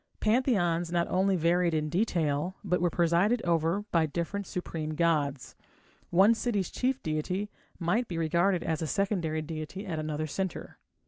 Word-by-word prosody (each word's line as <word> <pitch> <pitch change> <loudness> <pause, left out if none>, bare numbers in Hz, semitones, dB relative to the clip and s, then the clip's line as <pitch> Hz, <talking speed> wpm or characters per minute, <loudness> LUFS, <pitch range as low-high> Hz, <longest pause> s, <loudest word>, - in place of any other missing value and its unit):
Pantheons 195 -8 +1
not 170 -1 +1
only 190 +1 +2
varied 170 0 +2
in 155 -1 0
detail, 170 -2 0
but 180 -3 0
were 175 - +3
presided 175 +8 +2
over 170 +3 +1
by 165 -2 +3
different 175 +6 -3
supreme 155 -3 -4
gods. 150 -5 0 0.5
One 195 +6 +6
city's 215 -5 -1
chief 260 +1 -1
deity 180 +7 -2 0.3
might 200 +8 0
be 170 - -4
regarded 170 +3 +2
as 160 -1 -1
a 160 - -1
secondary 170 -5 -1
deity 160 +5 -6
at 165 -5 -3
another 155 0 -2
centre. 190 +4 -4
170 Hz, 150 wpm, -29 LUFS, 160-195 Hz, 0.5 s, One